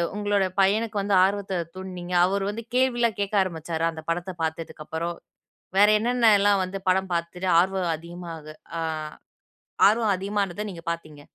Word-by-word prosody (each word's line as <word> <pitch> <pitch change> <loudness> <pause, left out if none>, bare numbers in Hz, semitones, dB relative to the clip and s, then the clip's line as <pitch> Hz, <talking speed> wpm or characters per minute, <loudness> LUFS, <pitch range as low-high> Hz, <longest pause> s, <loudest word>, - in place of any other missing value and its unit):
உங்களோட 205 -1 +1 0.2
பையனுக்கு 210 +2 +1
வந்து 200 0 +1
ஆர்வத்த 195 -1 0 0.2
தூண்ட்னீங்க? 180 -1 -7
அவரு 195 +1 0
வந்து 225 +3 -5
கேள்வி 255 -1 +2 0.2
கேக்க 200 +1 -1
ஆரம்பிச்சாரா? 165 -2 -3
அந்த 160 - -9
படத்த 175 +2 -2
பாத்ததுக்கப்பறம், 160 +1 -4 0.6
வேற 205 +1 +7
என்னென்னல்லாம் 210 -4 +4
வந்து 190 +1 -5
படம் 190 0 +1
பாத்துட்டு 175 +2 -2
ஆர்வம் 185 -2 +1
அதிகமா 170 +1 -9 0.5
ஆ - - -2 1.1
ஆர்வம் 220 -1 +2
அதிகமானத 200 0 -2
நீங்க 170 -2 -10
பாத்தீங்க. 155 -3 -7
190 Hz, 130 wpm, -25 LUFS, 170-205 Hz, 1.1 s, வேற